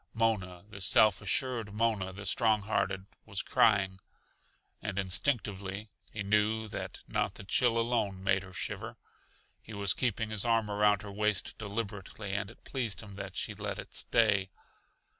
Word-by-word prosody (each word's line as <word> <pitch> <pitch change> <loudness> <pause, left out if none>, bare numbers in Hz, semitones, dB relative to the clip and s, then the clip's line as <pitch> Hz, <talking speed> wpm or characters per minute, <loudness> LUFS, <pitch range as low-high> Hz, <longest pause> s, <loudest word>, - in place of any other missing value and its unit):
Mona 100 -6 0
the 100 -2 -9
self 105 +1 +5
assured, 110 0 0
Mona 105 -4 +1
the 100 +2 -8
strong 110 0 +3
hearted, 95 -2 0 0.2
was 100 -3 -2
crying. 95 -3 +3 0.8
And 100 -2 -4
instinctively 100 - 0 0.2
he 105 - -4
knew 105 +2 +2
that - - -6
not - - -1
the - - -8
chill 115 +4 +4
alone 115 -5 0
made 95 0 +3
her 95 0 -11
shiver. - - -4 0.6
He 110 - -10
was 100 -1 +2
keeping 110 -2 -1
his 110 -3 +2
arm 115 -3 +2
around 105 0 +3
her 100 - -7
waist 105 0 0
deliberately, 100 -1 -5
and 100 0 -1
it 115 - -16
pleased 120 -6 -2
him 100 -2 -10
that - - -6
she - - -1
let - - -4
it - - -8
stay. 100 -4 +3
105 Hz, 160 wpm, -31 LUFS, 95-110 Hz, 0.8 s, self